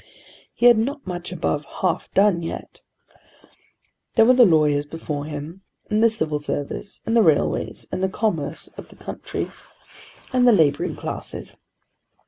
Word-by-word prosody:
He 240 - 0
had 240 -2 +8
not 275 +6 -2
much 180 -1 -5
above 155 -4 -1 0.2
half 180 -3 0
done 195 -3 +4
yet. 165 - -7 1.3
There 225 - +6
were 250 - +6
the 245 -3 +7
lawyers 150 -4 +3
before 145 -2 -5
him, 155 +5 -7 0.3
and 215 +1 +3
the 230 - +7
Civil 155 -9 -1
Service, 145 +6 -4
and 225 - 0
the 230 - +6
railways, 155 -7 +1
and - - -3
the 190 - +1
commerce 170 -9 -2
of - - -12
the - - -15
country, - - -5 0.8
and 250 -1 +4
the 240 - +7
labouring 150 -7 +2
classes. - - -7
180 Hz, 150 wpm, -23 LUFS, 150-220 Hz, 1.3 s, had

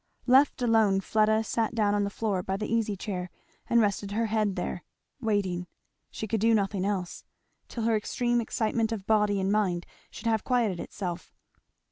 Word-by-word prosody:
Left 260 +1 +4
alone, 220 -4 +4
Fleda 215 +2 +2
sat 225 +1 -1
down 210 -2 +2
on 205 0 +2
the - - -2
floor 200 -3 -1
by 190 +2 -2
the 210 - -3
easy 225 -3 0
chair 180 -2 -4 0.4
and 235 - +5
rested 200 -2 0
her 230 +2 +1
head 215 -3 0
there; 180 -1 -4 0.4
waiting, 190 -6 -1 0.4
she 220 - -5
could 220 +1 0
do 225 0 +4
nothing 195 -2 0
else, 190 -3 -3 0.4
till 230 - -5
her 225 0 +2
extreme 240 +3 0
excitement 225 0 -1
of 210 -4 -4
body 210 -2 +2
and 190 +1 0
mind 185 -5 +1 0.2
should 215 - -11
have 220 -2 +1
quieted 230 -8 +1
itself. 175 -2 -5
215 Hz, 175 wpm, -28 LUFS, 195-225 Hz, 0.4 s, and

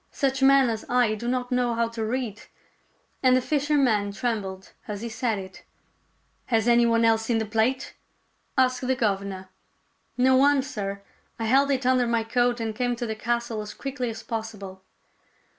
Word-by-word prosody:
Such 270 -1 -1
men 270 -1 +6
as 220 -1 -4
I 245 -3 +3
do 215 +2 -5
not 250 0 -1
know, 245 -1 +1
how 230 0 +1
to 230 -1 -4
read; 225 -2 -3 0.4
" - - -41
and 255 -1 +5
the - - +3
fisherman 270 -7 +1
trembled 200 -5 -3 0.2
as 210 +1 -5
he 235 - -4
said 225 -1 -1
it. 190 -1 -9 0.4
" - - -43
Has 225 -2 +1
any 235 0 +5
one 230 0 +3
else 225 -1 +3
seen 230 0 +1
the 220 - -1
plate? 225 +5 0 0.3
" - - -44
asked 255 -1 +2
the 260 - +2
governor. 195 -4 -2 0.4
" - - -43 0.3
No 260 +1 +4
one, 275 +1 +4
sir. 200 -6 -5 0.3
I 225 - -3
held 270 +5 +3
it 265 -2 0
under 255 -1 +3
my 230 -1 +1
coat 245 +1 +1
and 220 -1 -3
came 245 0 0
to 240 0 -4
the 220 - -2
castle 235 0 -2
as 210 0 -8
quickly 270 -3 -4
as 225 0 -7
possible." 210 -5 -6
235 Hz, 195 wpm, -25 LUFS, 220-255 Hz, 0.4 s, men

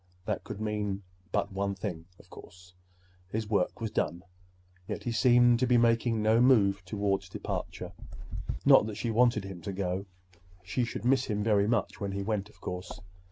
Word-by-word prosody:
That - - -2
could - - -7
mean 105 -2 -2 0.3
but 100 - -1
one 100 0 -1
thing, 90 -4 -5
of - - -18
course; 90 0 -14 0.5
his 110 +3 -3
work 100 -4 0
was 110 -2 -3
done. 85 +1 -1 0.6
Yet - - -4
he 120 - -2
seemed 120 0 +5
to 130 - +2
be 125 0 +4
making 115 -1 +2
no 110 +2 +4
move 100 -7 +4
toward 100 0 0
departure. - - -5 0.7
Not - - +7
that 110 - -5
she 115 - -2
wanted 115 -2 +3
him 95 -3 -8
to 100 - -4
go. 95 0 -2 0.6
She 120 +7 -1
should 115 -1 -6
miss 130 +1 +3
him 105 -2 -1
very 105 -2 +3
much 115 -3 -1
when 100 -1 -2
he 100 0 -2
went, 105 -1 -2
of - - -22
course. 90 -1 -6
105 Hz, 180 wpm, -30 LUFS, 95-115 Hz, 0.7 s, Not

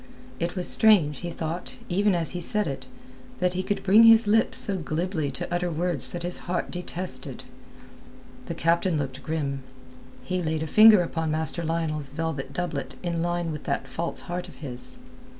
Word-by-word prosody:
It 170 +3 -2
was 180 -2 +1
strange, 175 -11 +4
he 175 - -5
thought, 165 +1 -5
even 200 +2 +2
as 165 -2 0
he 180 - -5
said 210 +4 +2
it, 135 -3 -5 0.5
that 180 0 +1
he 185 - -1
could 205 +2 -3
bring 200 +4 +6
his 225 -1 +7
lips 220 +2 +2
so 200 -2 +3
glibly 160 -1 -2
to 135 +5 -5
utter 175 0 0
words 170 -3 +1
that 175 -1 -5
his 175 0 -2
heart 175 - -2
detested. 180 +1 -2 1.0
The 170 - -4
captain 170 +1 +1
looked 135 -2 -4
grim. 140 -2 -3 0.6
He 185 -1 -2
laid 160 -1 -1
a - - -3
finger 215 +2 +7
upon 165 -1 -3
Master 160 +2 -2
Lionel's 155 -3 -2
velvet 150 -1 -4
doublet 140 -7 -4
in 170 -2 -2
line 175 -1 -1
with 150 -1 -7
that 135 - -2
false 165 +6 -4
heart 175 +1 -5
of - - -13
his. 130 -3 -4
170 Hz, 180 wpm, -26 LUFS, 155-180 Hz, 1.0 s, his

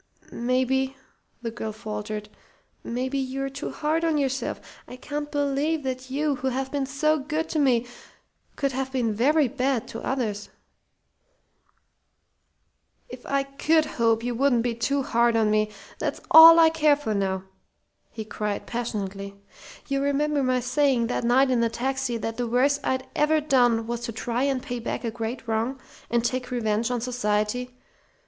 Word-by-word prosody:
"Maybe," 260 +2 0 0.5
the 230 - -3
girl 220 -1 -5
faltered, 210 0 -5 0.6
"maybe 260 +3 -2
you're 270 +1 -3
too 280 +3 -5
hard 320 +2 -1
on 325 -2 +2
yourself. 270 -2 -1 0.3
I - - -9
can't 295 +3 -5
believe 290 +2 0
that 260 0 -4
you, 285 +1 0
who 265 - -3
have 265 +1 -2
been 280 -2 -1
so 305 +3 +1
good 305 +3 -2
to 315 - -1
me, 250 -4 +3 0.7
could 275 -2 0
have 265 0 -3
been 240 -5 0
very 285 +7 +3
bad 260 -2 -1
to 225 - -6
others." 220 -6 -2 2.6
"If - - -10
I 275 0 +1
could 305 +3 +1
hope 230 -5 +1
you 245 0 -1
wouldn't 245 -1 +2
be 240 -1 0
too 270 +5 0
hard 235 -1 +2
on 215 -1 +2
me, 215 0 +2 0.3
that's - - -2
all 330 +1 +11
I 325 -1 +6
care 305 -2 +4
for 285 -7 -3
now!" 190 -2 -1 0.7
he 220 - -7
cried, 210 -1 -3
passionately. 200 -4 -4 0.5
"You 275 -1 0
remember 285 +1 +1
my 255 -1 +1
saying 255 -1 +2
that - - -2
night 260 +3 +4
in 250 - +2
the 230 0 +2
taxi 260 +1 -2
that 225 0 -4
the 245 -1 -1
worst 275 +5 +2
I'd 260 0 -1
ever 310 +1 +3
done 245 -6 +2
was 235 +1 -3
to - - -4
try 235 +3 -2
and 270 -2 -1
pay 245 -1 -4
back 235 - -4
a 230 - -2
great 230 +1 -5
wrong, 225 +4 -1 0.3
and 235 0 +1
take 255 +1 -2
revenge 225 -2 0
on 245 -2 -1
society? 245 +1 -1
255 Hz, 165 wpm, -25 LUFS, 230-275 Hz, 2.6 s, all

